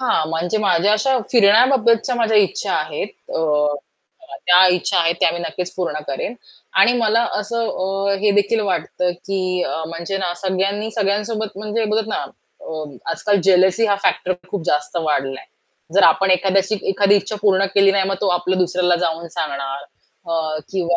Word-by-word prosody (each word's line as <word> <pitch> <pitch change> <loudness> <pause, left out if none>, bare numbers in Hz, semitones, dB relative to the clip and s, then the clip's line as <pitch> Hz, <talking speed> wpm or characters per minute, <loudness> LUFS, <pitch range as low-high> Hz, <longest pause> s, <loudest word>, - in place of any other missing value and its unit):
हां, 160 -11 0
म्हणजे 175 +6 -1
माझ्या 200 0 +2
अशा 255 +5 +2
फिरण्याबाबतच्या 235 +2 +4
माझ्या 225 -2 +1
इच्छा 200 -3 +1
आहेत. 155 +6 -3 0.3
अ, 150 -2 +1 0.7
त्या 180 +1 +7
इच्छा 180 +1 0
आहेत 170 0 +2
त्या - - +4
मी 175 - -4
नक्कीच 180 +1 -5
पूर्ण 170 -5 -3
करेन. 140 - -4 0.5
आणि 235 +5 +6
मला 230 0 +2 0.2
असं 230 +2 -2
अ, 195 +1 -1
हे 210 - +3
देखील 205 +2 +2
वाटतं 185 -2 -1 0.2
की 185 -2 -1
अ, 160 - -4
म्हणजे 170 +4 -5
ना, 180 -2 -2
सगळ्यांनी 195 +3 -1
सगळ्यांसोबत 210 +1 -2
म्हणजे 215 +2 -2
बघत 220 0 0
ना, - - -2 0.4
अ, 155 -1 -6 0.3
आजकाल 200 +2 0
जेलसी 190 +3 +4
हा 200 - +2
फॅक्टर 185 - +1
पण 180 0 -13
खूप 200 -4 -3
जास्त 150 +1 -1
वाढलाय. 135 -4 -2 0.5
जर 200 - +4
आपण 195 0 +4
एखाद्याशी 195 +3 +2
एखादी 200 +1 +3
इच्छा 200 +2 -3
पूर्ण 195 -2 +3
केली 195 -1 +5
नाही 195 -1 +2
मग 195 - 0
तो 200 - +1
आपल्या 185 +1 -1
दुसऱ्याला 180 -1 +1
जाऊन 170 -1 -2
सांगणार 140 -2 -4 0.5
अ, 160 -2 -1
किंवा 175 -2 0
190 Hz, 165 wpm, -19 LUFS, 170-210 Hz, 0.7 s, त्या